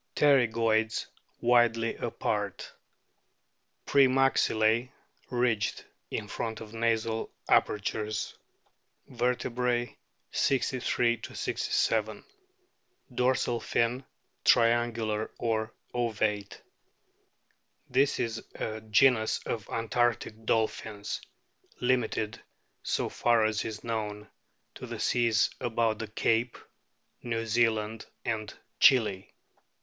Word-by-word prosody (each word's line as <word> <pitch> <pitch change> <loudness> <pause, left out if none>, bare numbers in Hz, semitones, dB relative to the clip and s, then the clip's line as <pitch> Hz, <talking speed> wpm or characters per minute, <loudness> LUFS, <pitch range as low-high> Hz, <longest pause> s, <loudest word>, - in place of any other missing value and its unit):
Pterygoids 115 -5 +3 0.4
widely 120 -1 +3
apart; - - -3 1.1
pre 140 -1 +5
maxillse 125 -3 +2 0.4
ridged 120 -4 0 0.2
in - - -4
front 110 -1 -4
of 110 -1 -10
nasal 115 -1 0 0.2
apertures. 105 +1 +1 0.7
Vertebrae, 125 -1 -1 0.4
63 125 -3 +1
67. 110 -1 -1 0.9
Dorsal 125 -1 +1
fin 120 +3 0 0.4
triangular 115 -2 +2
or 110 -1 -1 0.2
ovate. 110 -4 -1 1.3
This 135 +3 +2
is 115 -1 -2
a 110 0 -4
genus 110 +1 +3
of 110 -3 -4
antarctic 115 -1 -1
dolphins, 110 -2 -1 0.6
limited, 125 -4 0 0.4
so - - -1
far 120 -2 +2
as 110 0 0
is 110 -1 -6
known, 105 -2 -4 0.4
to - - -9
the - - -6
seas 115 -3 +2
about 115 -3 0
the 110 - -4
Cape, 115 +3 0 0.6
New 115 -1 -2
Zealand, 110 -1 0 0.2
and 110 -2 -2 0.3
Chili. 105 -7 +4
115 Hz, 85 wpm, -29 LUFS, 110-120 Hz, 1.3 s, pre